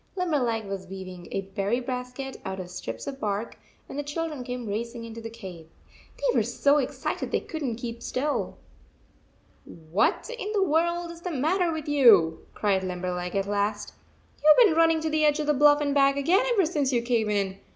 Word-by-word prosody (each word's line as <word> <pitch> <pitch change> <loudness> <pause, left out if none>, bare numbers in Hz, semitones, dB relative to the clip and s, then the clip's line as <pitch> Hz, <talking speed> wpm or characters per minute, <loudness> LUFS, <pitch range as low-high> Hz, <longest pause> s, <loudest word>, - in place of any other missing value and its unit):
Limberleg 265 - 0
was 195 -1 -6
weaving 185 -2 -8
144 - - -2
a 195 0 -6
berry 200 +5 0
basket 250 +1 -5
out 190 0 -5
of 180 -1 -7
strips 185 - -6
of 275 -1 -6
bark, 210 0 -3 0.3
when - - -8
the 290 - -2
children 300 -2 -4
came 245 -1 -5
racing 230 +3 -4
into 230 0 -8
the 225 - -6
cave. 190 -8 -10 0.5
They - - 0
were - - +4
so 285 +1 +2
excited 270 0 -3
they - - +1
could 315 - -7
n 250 -5 -1
t 235 - -13
keep 235 -1 -5
still. 285 +5 -2 0.5
" - - -35 0.3
What 205 +6 +2
in 425 -3 -5
the 405 -2 +3
world 340 +1 +1
is 335 0 -12
the 360 - -4
matter 335 +4 +1
with 315 -2 -5
you?" 220 - +5
cried 195 -3 +1
Limberleg, 180 0 -3
at 195 0 +1
last. 205 +1 -1 0.5
"You 305 - +8
ve - - +8
been 315 - 0
running 325 -1 +4
to 315 - -1
the 310 0 +2
edge 300 0 +3
of 305 - -1
the 300 - +3
bluff 290 +1 +5
and 285 -1 0
back 275 0 +4
again 370 - +3
ever 405 -7 +3
since 295 -5 0
you 240 -2 +1
came 235 -3 +1
in. 195 -2 -1
250 Hz, 210 wpm, -26 LUFS, 205-305 Hz, 0.5 s, You